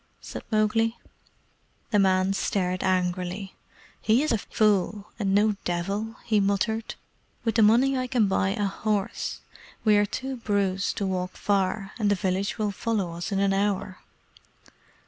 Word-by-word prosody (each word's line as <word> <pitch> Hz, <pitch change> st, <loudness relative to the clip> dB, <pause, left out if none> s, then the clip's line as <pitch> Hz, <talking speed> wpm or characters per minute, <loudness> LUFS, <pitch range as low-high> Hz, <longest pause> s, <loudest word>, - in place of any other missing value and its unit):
said -, -, -7 dB
Mowgli. 225 Hz, +1 st, +2 dB, 0.9 s
The 210 Hz, -, +4 dB
man 190 Hz, 0 st, +3 dB
stared 185 Hz, -2 st, -1 dB
angrily. 185 Hz, +1 st, -1 dB, 0.5 s
"He 225 Hz, +6 st, +3 dB
is 310 Hz, -, 0 dB
a 225 Hz, -, +2 dB
fool, 205 Hz, -1 st, +1 dB
and 195 Hz, -2 st, +1 dB
no 210 Hz, 0 st, +3 dB
devil," 200 Hz, +6 st, -2 dB
he 215 Hz, -2 st, +3 dB
muttered. 205 Hz, +3 st, 0 dB, 0.5 s
"With 225 Hz, -2 st, +1 dB
the 225 Hz, -, +3 dB
money 240 Hz, +6 st, +5 dB
I 255 Hz, -1 st, -1 dB
can 240 Hz, -4 st, +2 dB
buy 190 Hz, 0 st, +1 dB
a 205 Hz, +1 st, -1 dB
horse. 205 Hz, +1 st, -2 dB, 0.4 s
We 210 Hz, -1 st, +6 dB
are 205 Hz, 0 st, +3 dB
too 265 Hz, +4 st, -4 dB
bruised 200 Hz, -4 st, 0 dB
to 200 Hz, -, -1 dB
walk 185 Hz, -1 st, -2 dB
far, 195 Hz, 0 st, 0 dB
and 210 Hz, -2 st, +2 dB
the 205 Hz, -, +3 dB
village 190 Hz, +1 st, -1 dB
will 210 Hz, -2 st, 0 dB
follow 200 Hz, -4 st, -2 dB
us 170 Hz, +5 st, -5 dB
in 195 Hz, -, 0 dB
an 195 Hz, 0 st, +2 dB
hour." 195 Hz, -1 st, -1 dB
200 Hz, 155 wpm, -26 LUFS, 190-220 Hz, 0.9 s, We